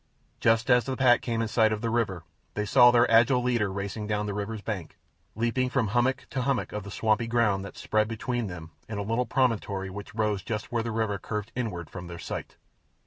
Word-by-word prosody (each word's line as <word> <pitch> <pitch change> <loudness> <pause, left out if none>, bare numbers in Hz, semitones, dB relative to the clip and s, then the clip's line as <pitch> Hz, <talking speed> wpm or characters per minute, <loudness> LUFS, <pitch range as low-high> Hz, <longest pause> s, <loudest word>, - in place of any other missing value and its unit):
Just 115 +2 +3
as 125 -2 +5
the 130 -1 -3
pack 125 -2 +5
came 115 -1 -1
in - - -1
sight 110 0 +3
of 105 -1 -2
the 115 -1 -1
river 105 -8 -1 0.3
they 105 - -1
saw 120 +4 +7
their 120 0 +5
agile 120 +2 +5
leader 120 -5 +1
racing 100 +2 -4
down 105 0 -1
the 105 - -3
river's 105 +1 -4
bank, 100 -7 -5 0.4
leaping 120 +3 0
from 125 -4 0
hummock 120 +4 +1
to 130 - -1
hummock 135 0 0
of 105 - -3
the 100 - -9
swampy 110 +3 +1
ground 115 -5 +2
that 100 - -9
spread 110 0 +1
between 115 +1 -2
them 85 -3 -8 0.2
and 105 -2 -4
a - - -2
little 115 +4 0
promontory 105 -6 0
which 105 +2 -9
rose 105 -3 0
just 105 0 -4
where 120 -1 +1
the 115 - -3
river 110 -3 -1
curved 105 +3 -4
inward 105 -10 -3
from 90 -2 -8
their 85 0 -7
sight. - - -6
110 Hz, 220 wpm, -27 LUFS, 100-120 Hz, 0.4 s, saw